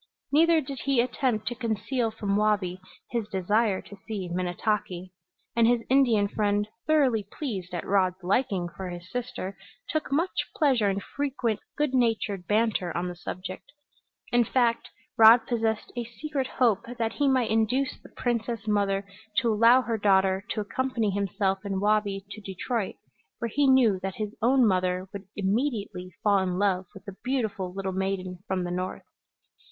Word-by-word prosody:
Neither 325 +2 +5
did 270 -2 -7
he 275 -3 +2
attempt 240 -3 0
to - - -3
conceal 230 +1 -1
from 205 -2 -2
Wabi 205 -4 +1 0.3
his 235 -4 -1
desire 205 +1 +1
to 200 - -11
see 205 -5 -3
Minnetaki; 185 +1 -2 0.4
and 230 -1 +5
his 240 -1 +2
Indian 240 -7 +4
friend, 205 0 0 0.2
thoroughly 260 -10 +3
pleased 200 - -4
at 175 - -4
Rod's 185 -2 +1
liking 195 -2 +1
for 185 +1 -7
his 175 +1 -9
sister, 245 -6 -4 0.3
took 310 -3 -2
much 330 +7 0
pleasure 255 -9 +3
in 195 0 -1
frequent 260 -4 -2 0.2
good 295 -3 +1
natured 220 -7 +1
banter 210 -4 +1
on 180 +1 -1
the 175 - -6
subject. 185 +1 -7 0.6
In 240 0 +5
fact, 235 0 +1 0.3
Rod 225 +1 +8
possessed 225 -2 -1
a 240 - -2
secret 265 +4 -4
hope 230 -8 +1
that 225 -1 -1
he 285 - +1
might 255 -4 +2
induce 225 +5 +1
the - - -14
princess 230 -2 -2
mother 200 -1 +1 0.3
to 230 -3 +3
allow 230 +4 +6
her 225 -1 -2
daughter 190 -1 +3
to 215 - -1
accompany 230 0 -1
himself 195 0 0
and 195 -2 -2
Wabi 205 -1 +1
to 215 - -8
Detroit, 200 +2 -3 0.4
where 235 - -3
he 280 +5 +2
knew 245 -7 +5
that 190 0 -4
his 210 -1 -4
own 255 +2 +4
mother 185 -2 +1
would 200 -1 -7
immediately 205 -3 -1
fall 205 -2 +4
in 180 -1 -1
love 190 -2 +1
with 195 - -12
the 200 -2 -8
beautiful 220 -8 -1
little 190 0 -3
maiden 185 -1 -2
from 185 -1 -1
the 175 - -3
North. 185 +1 -3
210 Hz, 165 wpm, -27 LUFS, 190-240 Hz, 0.6 s, Rod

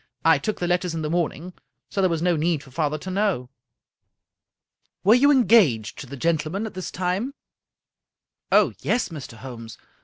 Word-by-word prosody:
I - - +5
took 215 - -3
the 175 - -1
letters 180 -1 0
in 160 - -3
the 150 - -2
morning, 175 +1 -2 0.4
so 195 - 0
there 185 - +3
was 165 -1 -1
no 175 -1 +3
need 155 -1 0
for 135 - -16
father 155 +1 -1
to 185 +5 -7
know." 190 -11 0 0.7
" - - -54
Were 205 - +6
you 265 +4 +5
engaged 220 - +4
to 135 - -8
the 140 +2 -8
gentleman 165 - -1
at 220 - -6
this 185 -1 -5
time? 185 +10 -2 0.4
" - - -66
" - - -54
Oh, - - +4
yes, 245 - 0
Mr. 140 -7 -9
Holmes. 115 -2 -9
170 Hz, 190 wpm, -24 LUFS, 150-195 Hz, 0.7 s, Were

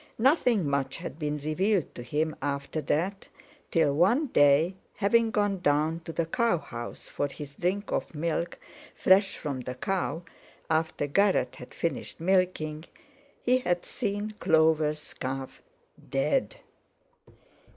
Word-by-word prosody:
Nothing 240 - +3
much 140 -1 -1
had 170 -2 -7
been 150 -1 -1
revealed 175 +5 0
to - - -8
him 150 +6 -1
after 140 +2 -2
that, 180 +7 -1 0.4
till 160 -4 +3
one 195 - +3
day, 145 +5 +5 0.2
having 225 +3 +3
gone 205 -4 +1
down 155 0 +2
to - - -5
the 165 0 -1
cow 230 +2 +2
house 120 -6 -8
for 145 - -2
his 145 0 -9
drink 190 +7 -1
of - - -2
milk 170 +2 -2 0.4
fresh 195 +1 +4
from 140 -4 -4
the 125 0 -5
cow, 180 +2 -2 0.5
after 160 -2 +1
Garratt 185 -4 +2
had 125 - -11
finished 170 - -3
milking, 170 -3 +1 0.6
he 250 +1 +4
had 175 -7 -1
seen 210 -2 -3
Clover's 155 -1 +2
calf, 130 0 -5 0.5
dead. - - +1
160 Hz, 130 wpm, -28 LUFS, 145-195 Hz, 0.6 s, day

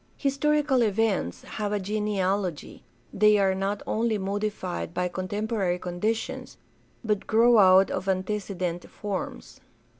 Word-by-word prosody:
Historical 285 -1 +1
events 210 - 0
have 210 -1 -4
a 210 - 0
genealogy; 195 -4 -2 0.3
they 210 +1 +5
are 195 -1 +3
not 195 +2 -2
only 225 0 0
modified 195 -3 -3
by 180 0 0
contempo 205 +5 -3
rary 180 -2 +1
conditions, 180 +6 -3 0.5
but 210 -3 -1
grow 230 +1 +5
out 190 0 +6
of 190 +1 -3
antecedent 185 -2 -2
forms. 190 - -6
205 Hz, 120 wpm, -26 LUFS, 185-215 Hz, 0.5 s, out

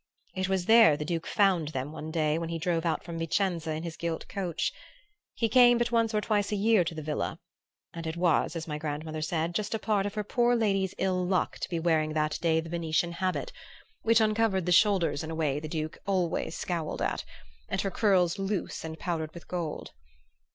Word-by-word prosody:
It 190 -1 -2
was 190 -2 0
there 225 -9 +7
the 150 - -4
Duke 165 0 -3
found 190 -6 +2
them 140 -1 -4
one 155 0 -7
day 155 -1 +1
when 165 -1 -4
he 165 - -2
drove 170 0 0
out 160 - -1
from 170 -1 -6
Vicenza 165 0 0
in 155 +1 -4
his 165 -2 -5
gilt 170 -1 -3
coach. 180 -5 -2 0.6
He 230 - +1
came 245 +1 +6
but 240 0 0
once 230 -1 +2
or 215 -2 +1
twice 205 -2 0
a - - +1
year 210 -1 +4
to 165 0 -4
the 155 - -5
villa, 150 0 -3 0.5
and 165 -1 -6
it 160 +1 -4
was, 170 -1 +2
as 165 0 -4
my 150 -1 -4
grandmother 155 +1 -4
said, 165 +1 -1
just 210 +4 -1
a - - +1
part 210 -2 0
of 205 - -7
her 210 - -1
poor 240 +3 +2
lady's 195 -5 +1
ill 185 -1 0
luck 180 0 0
to - - -4
be 170 -3 -1
wearing 160 -2 +1
that 155 0 0
day 160 -1 +3
the 165 - -5
Venetian 170 0 0
habit, 185 - -2 0.5
which 230 0 +4
uncovered 215 -4 +2
the 180 - 0
shoulders 175 -5 +3
in 160 - -6
a 160 - -4
way 150 -3 0
the 155 - -6
Duke 155 0 -4
always 180 -4 0
scowled 170 -4 -3
at, - - -1 0.5
and 190 - 0
her 195 - -2
curls 190 -3 +2
loose 195 -1 -2
and 160 0 -6
powdered 160 -3 -3
with 170 - -11
gold. 170 -4 -4
170 Hz, 215 wpm, -29 LUFS, 160-200 Hz, 0.6 s, there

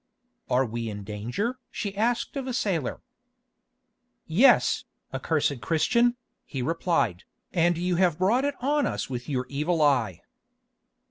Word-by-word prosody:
"Are 130 +2 +3
we 115 0 -4
in 105 -1 -6
danger?" 120 - -3
she 200 -2 -4
asked 235 +6 0
of 270 -2 -3
a 255 - -2
sailor. 170 - -1 1.2
"Yes, 220 +13 +4 0.3
accursed 145 -5 0
Christian," 235 - +2 0.3
he 130 -4 -4
replied, 165 - 0 0.3
"and 175 -1 +3
you 180 0 0
have 175 -4 +3
brought 210 +9 +2
it 285 0 0
on 290 +1 +2
us - - -3
with 125 +1 -5
your 130 -3 -1
evil 150 +4 -1
eye." 130 - +2
165 Hz, 135 wpm, -26 LUFS, -, 1.2 s, Yes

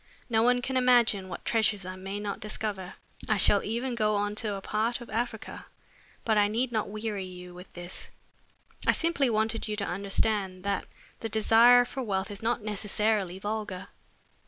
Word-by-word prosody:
No 220 -1 +4
one 245 +1 +3
can 260 +1 -1
imagine 240 -6 +4
what 175 - -7
treasures 215 -4 +2
I 185 0 -5
may 195 +2 -5
not 205 0 -4
discover. 210 -4 -4 0.3
I 215 - +3
shall 200 0 +4
even 240 +4 -2
go 215 -2 +1
on 205 0 0
to 215 -3 -1
a - - -4
part 220 +4 -1
of 240 - -11
Africa 225 0 -4 0.6
but 220 -2 +3
I 205 - +4
need 235 +4 -1
not 215 -3 -1
weary 210 -1 -3
you 180 -1 -10
with 180 +1 -12
this. 175 +1 -5 0.8
I - - +6
simply 325 -6 +1
wanted 220 0 0
you 215 - -2
to 205 -1 -2
understand 195 0 -1
that 200 0 -1 0.3
the 225 - -4
desire 230 +3 +6
for 265 +2 -5
wealth 200 -3 -2
is 200 - -6
not 230 0 0
necessarily 210 -2 0
vulgar." 205 -2 -4
215 Hz, 180 wpm, -28 LUFS, 195-230 Hz, 0.8 s, I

